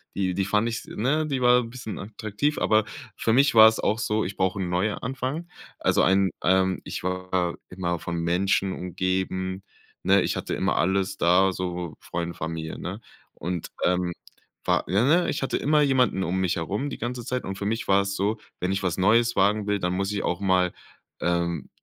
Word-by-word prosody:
Die 95 Hz, -2 st, 0 dB
die 95 Hz, -1 st, 0 dB
fand 105 Hz, +3 st, +1 dB
ich 115 Hz, -, -3 dB
s -, -, -8 dB
ne, 150 Hz, +8 st, 0 dB
die 135 Hz, -3 st, -2 dB
war 125 Hz, 0 st, +5 dB
'n 115 Hz, -, -8 dB
bisschen 120 Hz, -5 st, -7 dB
attraktiv, 110 Hz, +7 st, -2 dB
aber 110 Hz, 0 st, +3 dB, 0.3 s
für 110 Hz, -, +1 dB
mich 140 Hz, +1 st, +4 dB
war 110 Hz, 0 st, +10 dB
es 110 Hz, -, +2 dB
auch 110 Hz, +2 st, 0 dB
so: 110 Hz, 0 st, 0 dB
„Ich 95 Hz, +2 st, -5 dB
brauche 95 Hz, +1 st, 0 dB
'n 90 Hz, -2 st, -2 dB
Neuanfang“. 130 Hz, -, -2 dB, 0.3 s
Also -, -, +2 dB
ein, 95 Hz, +1 st, +4 dB
ähm 95 Hz, 0 st, +3 dB
ich -, -, -5 dB
war 90 Hz, -1 st, -1 dB
immer 85 Hz, -2 st, -2 dB
von 85 Hz, -, -4 dB
Menschen 95 Hz, +3 st, +1 dB
umgeben, 95 Hz, +1 st, -2 dB, 0.4 s
ne? 95 Hz, 0 st, +5 dB
Ich -, -, -1 dB
hatte -, -, -3 dB
immer -, -, 0 dB
alles 95 Hz, +2 st, +1 dB
da, 95 Hz, +2 st, +4 dB
so 90 Hz, -3 st, -4 dB
Freunde, 85 Hz, 0 st, -4 dB
Familie, 80 Hz, -1 st, -5 dB
ne? 95 Hz, +5 st, -6 dB, 0.3 s
Und, 85 Hz, -1 st, -4 dB
ähm, 90 Hz, -1 st, +1 dB, 0.5 s
war -, -, +2 dB
ja, 100 Hz, +6 st, +3 dB
ne, 170 Hz, +5 st, +3 dB
ich -, -, -2 dB
hatte -, -, -1 dB
immer 150 Hz, +1 st, +2 dB
jemanden 130 Hz, -8 st, +2 dB, 0.2 s
mich 90 Hz, -1 st, 0 dB
herum 100 Hz, -, -2 dB
die -, -, -6 dB
ganze 120 Hz, 0 st, -4 dB
Zeit 125 Hz, 0 st, -2 dB
und 95 Hz, 0 st, -5 dB
für 100 Hz, -, -4 dB
mich 110 Hz, +1 st, -2 dB
war 100 Hz, 0 st, +5 dB
es 100 Hz, 0 st, -3 dB
so, 105 Hz, +3 st, 0 dB, 0.2 s
wenn 90 Hz, +1 st, -1 dB
ich 95 Hz, -, -2 dB
was 90 Hz, -2 st, 0 dB
Neues 115 Hz, +5 st, +3 dB
wagen 105 Hz, +2 st, +3 dB
will, 105 Hz, -1 st, +1 dB
dann 90 Hz, 0 st, -1 dB
muss 95 Hz, +2 st, -1 dB
ich 100 Hz, -1 st, -2 dB
auch 90 Hz, +3 st, -1 dB
mal, 95 Hz, -2 st, +2 dB, 0.5 s
ähm, 85 Hz, -3 st, -1 dB
95 Hz, 200 wpm, -25 LUFS, 90-110 Hz, 0.5 s, war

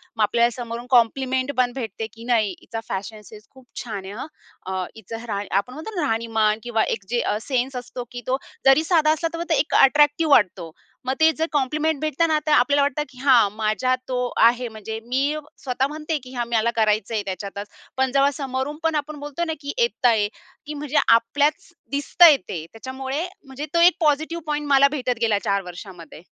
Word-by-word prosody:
मग 220 Hz, -, +1 dB
आपल्याला 235 Hz, +3 st, +3 dB
समोरून 235 Hz, -1 st, -6 dB
कॉम्प्लिमेंट 260 Hz, +2 st, +2 dB
पण 245 Hz, -1 st, +2 dB
भेटते 225 Hz, -4 st, -5 dB
की 230 Hz, -, -12 dB
नाही 220 Hz, -3 st, +3 dB
हिचा 225 Hz, -, -6 dB
फॅशन 210 Hz, +3 st, -5 dB
सेन्स 210 Hz, +1 st, -14 dB
खूप 260 Hz, -1 st, -18 dB, 0.2 s
छान 205 Hz, -5 st, -6 dB
आहे 195 Hz, -, -7 dB
हं. 250 Hz, +7 st, -6 dB, 0.4 s
अ, 190 Hz, 0 st, -2 dB
हिचं 225 Hz, +2 st, -8 dB
राह 200 Hz, -2 st, -2 dB
आपण 200 Hz, +6 st, -2 dB
म्हणतो 320 Hz, +10 st, -8 dB
ना 325 Hz, -5 st, 0 dB
राहणीमान 225 Hz, -2 st, +1 dB
किंवा 225 Hz, -2 st, 0 dB
एक 215 Hz, -, -2 dB
जे 240 Hz, 0 st, 0 dB
अ, -, -, 0 dB
सेन्स 260 Hz, +1 st, -1 dB
असतो 245 Hz, 0 st, -6 dB
की 245 Hz, -, -7 dB
तो 260 Hz, +1 st, +1 dB, 0.3 s
जरी 270 Hz, +4 st, +6 dB
साधा 320 Hz, -2 st, +3 dB
असला 315 Hz, +1 st, 0 dB
तरी 335 Hz, 0 st, -3 dB
तो -, -, +3 dB
एक 290 Hz, -, 0 dB
अट्रॅक्टिव्ह 295 Hz, +3 st, +4 dB
वाटतो. 185 Hz, -8 st, +2 dB, 0.3 s
मग 260 Hz, -, 0 dB
ते 320 Hz, 0 st, +6 dB
जर 320 Hz, -, +1 dB
कॉम्प्लिमेंट 300 Hz, +2 st, 0 dB
भेटत 310 Hz, +1 st, -3 dB
ना, 315 Hz, -1 st, +2 dB
तर 305 Hz, -, 0 dB
आपल्याला 285 Hz, 0 st, +4 dB
वाटतं 285 Hz, +1 st, 0 dB
की 255 Hz, -, -18 dB
हां 245 Hz, -7 st, +5 dB
माझ्या 215 Hz, +3 st, 0 dB, 0.2 s
तो 255 Hz, -, -1 dB, 0.3 s
आहे. 240 Hz, +1 st, +3 dB
म्हणजे 220 Hz, 0 st, -7 dB
मी 250 Hz, +2 st, -1 dB, 0.5 s
स्वतः 260 Hz, 0 st, 0 dB
म्हणते 305 Hz, +2 st, -3 dB
की 255 Hz, 0 st, -12 dB
"हां, 240 Hz, -1 st, -2 dB
मला 235 Hz, 0 st, +1 dB
करायचंय 215 Hz, 0 st, +1 dB
त्याच्यातच." 200 Hz, +1 st, -5 dB, 0.3 s
पण 265 Hz, 0 st, +1 dB
जेव्हा 275 Hz, +1 st, +3 dB
समोरून 270 Hz, +1 st, -3 dB
पण 325 Hz, -1 st, +1 dB
आपण 300 Hz, 0 st, -3 dB
बोलतो 290 Hz, +3 st, -4 dB
ना, 320 Hz, -, -2 dB
की 285 Hz, -1 st, -5 dB
येतंय 245 Hz, -, +2 dB, 0.4 s
की 300 Hz, -, -6 dB
म्हणजे 295 Hz, -2 st, -3 dB
आपल्याच 285 Hz, +9 st, +2 dB, 0.2 s
दिसतंय 290 Hz, +2 st, +6 dB
ते 160 Hz, -3 st, -4 dB
त्याच्यामुळे 265 Hz, +7 st, -4 dB, 0.2 s
म्हणजे 270 Hz, +2 st, -6 dB
तो 335 Hz, -, +3 dB
एक 350 Hz, +1 st, +7 dB
पॉझिटिव्ह 315 Hz, +1 st, +1 dB
पॉइंट 295 Hz, 0 st, -2 dB
मला 280 Hz, 0 st, +6 dB
भेटत 250 Hz, -5 st, -2 dB
गेला 220 Hz, -3 st, +2 dB
4 200 Hz, 0 st, +1 dB
वर्षामध्ये. 175 Hz, -3 st, -11 dB
255 Hz, 195 wpm, -23 LUFS, 225-295 Hz, 0.5 s, एक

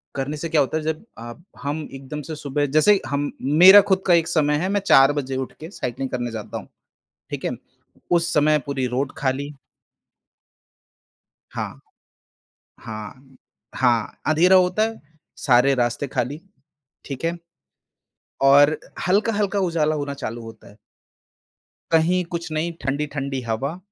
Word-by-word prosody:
करने 140 Hz, +3 st, -3 dB
से 165 Hz, +2 st, -5 dB
क्या 155 Hz, -3 st, +3 dB
होता 140 Hz, +3 st, -1 dB
है 155 Hz, -, -4 dB
जब 160 Hz, +4 st, -3 dB, 0.2 s
आप 120 Hz, +8 st, -10 dB, 0.2 s
हम 145 Hz, +2 st, -2 dB
एकदम 135 Hz, +2 st, -7 dB
से 155 Hz, +3 st, -6 dB
सुबह 145 Hz, 0 st, -2 dB
जैसे 205 Hz, +7 st, +6 dB
ही 195 Hz, -, +1 dB
हम 145 Hz, +1 st, -2 dB, 0.3 s
मेरा 195 Hz, +2 st, +11 dB
खुद 190 Hz, 0 st, +2 dB
का 175 Hz, -, +5 dB
एक 165 Hz, -1 st, +3 dB
समय 150 Hz, -3 st, +1 dB
है 185 Hz, +4 st, -1 dB
मैं 205 Hz, 0 st, +1 dB
चार 135 Hz, +1 st, +7 dB
बजे 135 Hz, -2 st, -3 dB
उठ 130 Hz, -, -4 dB
के 160 Hz, +2 st, -8 dB
साइक्लिंग 130 Hz, -, -4 dB
करने 120 Hz, -2 st, -3 dB
जाता 110 Hz, -2 st, -6 dB
हूँ। -, -, -9 dB, 0.6 s
ठीक -, -, -5 dB
है। -, -, 0 dB, 0.6 s
उस 170 Hz, -1 st, +2 dB
समय 150 Hz, 0 st, +3 dB
पूरी 135 Hz, -2 st, -1 dB
रोड 130 Hz, +3 st, -2 dB
खाली। 140 Hz, +2 st, -2 dB, 2.0 s
हाँ। -, -, -5 dB, 1.0 s
हाँ, 130 Hz, +5 st, -10 dB, 0.4 s
हाँ, 120 Hz, -4 st, +1 dB
अँधेरा 175 Hz, +5 st, +5 dB
होता 185 Hz, +3 st, +3 dB
है। 225 Hz, 0 st, -3 dB, 0.4 s
सारे 130 Hz, +1 st, +4 dB
रास्ते 120 Hz, +3 st, -1 dB
खाली, 140 Hz, +3 st, -3 dB, 0.7 s
ठीक 140 Hz, +2 st, -7 dB
है 170 Hz, +1 st, -1 dB, 1.1 s
और 145 Hz, +2 st, +6 dB, 0.3 s
हल्का-हल्का 205 Hz, 0 st, +1 dB
उजाला 160 Hz, -4 st, +1 dB
होना 145 Hz, -1 st, -4 dB
चालू 120 Hz, -4 st, -6 dB
होता 115 Hz, 0 st, -12 dB
है। 105 Hz, -, -19 dB, 1.2 s
कहीं 175 Hz, +3 st, +3 dB
कुछ 170 Hz, -1 st, -4 dB
नहीं 165 Hz, +2 st, -1 dB
ठंडी-ठंडी 140 Hz, -1 st, -2 dB
हवा 140 Hz, +10 st, -2 dB
145 Hz, 150 wpm, -22 LUFS, 135-165 Hz, 2.0 s, मेरा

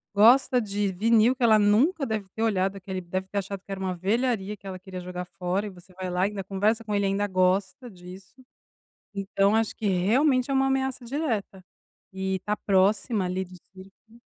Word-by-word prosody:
Gosta 245 Hz, +4 st, +5 dB
de 205 Hz, -2 st, -1 dB
vinil 225 Hz, +5 st, +3 dB
que 250 Hz, -, -4 dB
ela 220 Hz, -2 st, +6 dB
nunca 250 Hz, -, +3 dB
deve 215 Hz, -4 st, -3 dB
ter 225 Hz, -, -2 dB
olhado 195 Hz, -3 st, +1 dB
aquele 190 Hz, -1 st, -5 dB
deve 185 Hz, +2 st, -4 dB
ter 200 Hz, +1 st, -2 dB
achado, 195 Hz, 0 st, -5 dB
que 200 Hz, -, -12 dB
era 195 Hz, -, -4 dB
uma 185 Hz, -1 st, -2 dB
velharia 210 Hz, +2 st, -1 dB
que 200 Hz, -, -24 dB
ela 185 Hz, -1 st, -5 dB
queria 185 Hz, 0 st, -8 dB
jogar 180 Hz, 0 st, -6 dB
fora 180 Hz, +3 st, -3 dB
e -, -, -5 dB
você 185 Hz, -1 st, -16 dB
vai 185 Hz, 0 st, -5 dB
lá 180 Hz, +1 st, +1 dB
e -, -, -3 dB
ainda 200 Hz, -2 st, -5 dB
conversa 205 Hz, +4 st, 0 dB
com 215 Hz, -2 st, -4 dB
ele 200 Hz, -1 st, +1 dB
e -, -, +2 dB
ainda 200 Hz, +1 st, 0 dB
gosta 190 Hz, +7 st, 0 dB
disso, 185 Hz, +2 st, -13 dB, 0.8 s
então, 195 Hz, +1 st, +2 dB
acho 225 Hz, -1 st, 0 dB
que 215 Hz, -, -4 dB
realmente 250 Hz, +9 st, +2 dB
é -, -, +1 dB
uma 270 Hz, 0 st, +3 dB
ameaça 265 Hz, -1 st, -1 dB
direta, 230 Hz, -, -3 dB, 0.5 s
e 190 Hz, 0 st, -2 dB
está 205 Hz, +3 st, -2 dB
próxima 200 Hz, +1 st, +1 dB
ali 185 Hz, +1 st, -2 dB
do 185 Hz, 0 st, -15 dB, 0.2 s
círculo. 195 Hz, +5 st, -17 dB
200 Hz, 205 wpm, -26 LUFS, 185-225 Hz, 0.8 s, ela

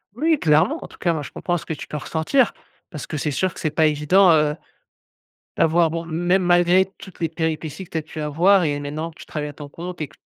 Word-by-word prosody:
Oui, 310 Hz, +4 st, +2 dB
clairement! 165 Hz, -, +3 dB
En -, -, -8 dB
tout -, -, -17 dB
cas 170 Hz, -, +1 dB
moi, 155 Hz, -, -3 dB
je -, -, -8 dB
comprends 175 Hz, -1 st, -2 dB
ce -, -, -9 dB
que 160 Hz, -, -3 dB
tu -, -, -8 dB
peux 150 Hz, -, -5 dB
ressentir. 165 Hz, -, +1 dB, 0.4 s
Parce 150 Hz, -7 st, -7 dB
que 155 Hz, -, -4 dB
c'est 150 Hz, +1 st, -1 dB
sûr 185 Hz, +6 st, -1 dB
que -, -, -11 dB
c'est 155 Hz, -, 0 dB
pas 155 Hz, +1 st, +2 dB
évident, 170 Hz, +6 st, +4 dB
heu, 150 Hz, -2 st, +3 dB, 1.0 s
d'avoir 165 Hz, +1 st, +3 dB
bon 165 Hz, +1 st, -4 dB
même 175 Hz, +3 st, +1 dB
malgré 175 Hz, +1 st, +4 dB
toutes 190 Hz, -, -13 dB
les 165 Hz, -2 st, 0 dB
péripéties 160 Hz, +1 st, -3 dB
que -, -, -23 dB
tu 165 Hz, -, -2 dB
as -, -, 0 dB
pu 155 Hz, +1 st, -10 dB
avoir 175 Hz, +6 st, +3 dB
et 145 Hz, -1 st, -1 dB
maintenant 150 Hz, +3 st, -4 dB
que -, -, -22 dB
tu -, -, -10 dB
travailles 150 Hz, -1 st, -4 dB
à -, -, -9 dB
ton 145 Hz, 0 st, -10 dB
compte 175 Hz, +3 st, -7 dB
et 155 Hz, -, -2 dB
que 115 Hz, -, -21 dB
160 Hz, 255 wpm, -22 LUFS, 150-180 Hz, 1.0 s, évident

